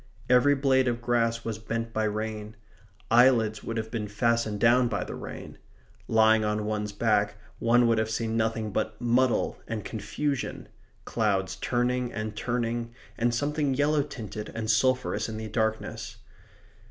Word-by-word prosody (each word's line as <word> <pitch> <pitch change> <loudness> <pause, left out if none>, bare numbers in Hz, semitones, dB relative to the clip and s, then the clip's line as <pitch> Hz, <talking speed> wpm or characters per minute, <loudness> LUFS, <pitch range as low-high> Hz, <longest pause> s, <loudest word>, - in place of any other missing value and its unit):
Every 130 +3 +5
blade 135 -1 +3
of 120 -1 0
grass 115 -1 0
was 110 -2 -3
bent 115 +1 -4
by 110 0 0
rain. 110 0 -3 0.6
Eyelids 115 -3 +4
would 115 - -4
have 110 0 -4
been 110 -3 -3
fastened 110 0 0
down 120 +2 +5
by - - -2
the - - -7
rain. - - -8 0.5
Lying 110 0 +4
on 105 0 -1
one's 105 -1 -2
back 105 -1 +1 0.2
one 120 +1 +4
would 115 -1 +3
have 110 0 0
seen 115 0 -2
nothing 110 -1 0
but 110 +1 -2
muddle 120 +1 +1
and 110 -2 -4
confusion 115 +6 -3 0.4
clouds 95 -4 0
turning 125 +3 0
and 110 -1 -4
turning, 120 0 -2 0.2
and 120 +1 +1
something 145 +2 0
yellow 145 +2 +2
tinted 110 -7 -6
and 110 -1 0
sulphurous 130 -3 +1
in 110 - -5
the 110 0 -5
darkness. 110 +1 -2
115 Hz, 155 wpm, -27 LUFS, 110-120 Hz, 0.6 s, Every